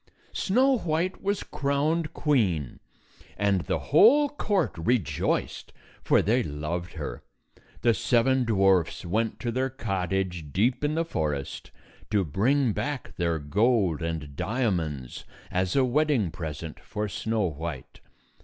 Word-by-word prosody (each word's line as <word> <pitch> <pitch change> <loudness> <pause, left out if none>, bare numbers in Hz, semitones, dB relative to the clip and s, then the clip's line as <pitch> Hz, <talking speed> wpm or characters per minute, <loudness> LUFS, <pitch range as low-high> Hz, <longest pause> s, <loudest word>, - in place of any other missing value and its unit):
Snow 255 +5 +2
White 170 +2 -1
was 200 0 -1
crowned 150 +3 0
queen, 95 - 0 0.6
and 100 -2 +2
the - - -1
whole 260 - +5
court 205 - -1
rejoiced, 95 +4 -1 0.3
for - - +3
they 115 +7 +2
loved 85 +1 -4
her. - - -6 0.6
The 120 -1 +5
seven 130 +3 +2
dwarfs 95 -7 +2
went 110 +4 -1
to 120 - -1
their 130 +3 0
cottage, 95 - -2
deep 115 - +1
in 150 +1 +1
the 165 +1 0
forest, 75 - -3 0.4
to 105 -3 +2
bring 115 - +2
back 145 +3 -4
their 85 -2 0
gold 95 - +1
and 80 -4 -4
diamonds 85 - -2 0.3
as 90 0 0
a 135 -2 +4
wedding 130 - +1
present 80 -1 -6
for 105 0 -4
Snow 110 +2 -1
White. 80 -5 -5
105 Hz, 125 wpm, -27 LUFS, 85-140 Hz, 0.6 s, whole